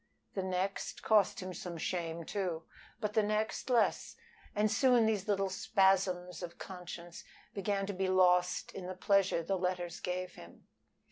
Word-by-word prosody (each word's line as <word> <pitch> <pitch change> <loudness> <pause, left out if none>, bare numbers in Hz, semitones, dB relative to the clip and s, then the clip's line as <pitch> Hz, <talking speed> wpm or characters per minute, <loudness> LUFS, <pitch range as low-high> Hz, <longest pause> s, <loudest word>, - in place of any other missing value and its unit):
The 195 - -1
next 190 +1 -2
cost 210 -4 +3
him 185 0 -5
some 175 0 -6
shame, 170 -1 -2
too, 180 -5 -2 0.4
but 210 -2 -2
the 220 - +4
next 215 +4 -1
less, 240 -2 +2 0.4
and 210 0 +2
soon 245 0 +5
these 215 -3 0
little 195 -2 +1
spasms 190 -2 +2
of 170 -1 -7
conscience 175 -2 -8 0.3
began 200 0 -1
to 200 - -3
be 190 0 -1
lost 180 -1 +3
in 185 -2 -6
the 185 - -5
pleasure 195 -2 +2
the 190 +3 -1
letters 180 -1 -2
gave 180 0 -3
him. 85 - -14
185 Hz, 155 wpm, -33 LUFS, 180-200 Hz, 0.4 s, soon